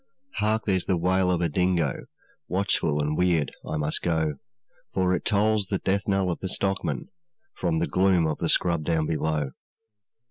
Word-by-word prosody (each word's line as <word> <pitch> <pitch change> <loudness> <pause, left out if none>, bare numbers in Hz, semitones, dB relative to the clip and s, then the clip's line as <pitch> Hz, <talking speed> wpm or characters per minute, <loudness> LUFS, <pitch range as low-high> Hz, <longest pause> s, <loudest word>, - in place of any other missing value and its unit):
'Hark! 110 +1 +1
there's 95 -4 0
the 95 - +2
wail 90 +2 +2
of 90 -1 +1
a 85 - +2
dingo, 85 -3 0 0.4
Watchful 90 -5 0
and 75 +1 0
weird 85 -4 +2
I 80 - -3
must 75 0 0
go, 80 -4 0 0.6
For 95 -1 +2
it 90 - -1
tolls 105 -1 +2
the 100 - 0
death 95 +1 -1
knell 95 -2 +1
of 85 - -4
the 95 - -4
stockman 95 +1 -2 0.4
From 165 - -1
the 165 - +1
gloom 95 - +3
of 80 -1 -1
the 85 - 0
scrub 85 -3 +2
down 80 0 +1
below. 75 -3 -1
90 Hz, 175 wpm, -26 LUFS, 80-95 Hz, 0.6 s, gloom